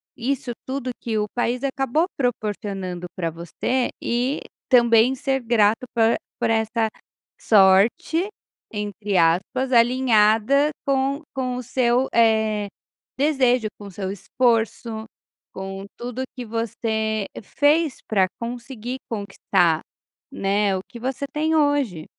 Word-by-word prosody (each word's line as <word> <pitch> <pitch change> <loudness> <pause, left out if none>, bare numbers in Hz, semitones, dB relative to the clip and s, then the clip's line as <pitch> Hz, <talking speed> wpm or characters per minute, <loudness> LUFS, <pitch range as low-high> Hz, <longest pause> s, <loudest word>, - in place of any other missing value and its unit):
isso 255 +1 -2 0.2
tudo 260 -1 -3
que 225 -2 -2
o 210 0 0
país 245 0 0
acabou 275 +3 +1
proporcionando 200 -7 -3
pra 165 -3 -2
você. 175 +10 -2
E 250 +4 -1 0.3
também 235 0 +5
ser 270 0 0
grato 225 0 +2
por 225 0 +4 0.2
por - - +1
esta 220 0 +1 0.5
sorte, 210 - +4 0.4
entre 210 -1 -2
aspas, 190 +11 +2
alinhada 240 +2 +4 0.2
com 275 +2 0
com 255 -2 -2
o 250 - -5
seu, 250 +1 +1
eh, 220 -2 +3 0.5
desejo, 260 -5 +2
com 205 - -9
o - - -10
seu 190 0 -4
esforço, 225 +2 0 0.5
com 195 0 -6
tudo 245 +1 -5
que 250 -2 -6
você 220 -1 -2 0.2
fez 295 +5 +2
pra 195 -3 +3
conseguir 245 +1 -5
conquistar, 195 -6 +1 0.5
né, 200 -5 +1
o - - -4
que 240 - -11
você 265 +3 -3
tem 310 +2 0
hoje. 285 - +1
230 Hz, 120 wpm, -23 LUFS, 210-260 Hz, 0.5 s, também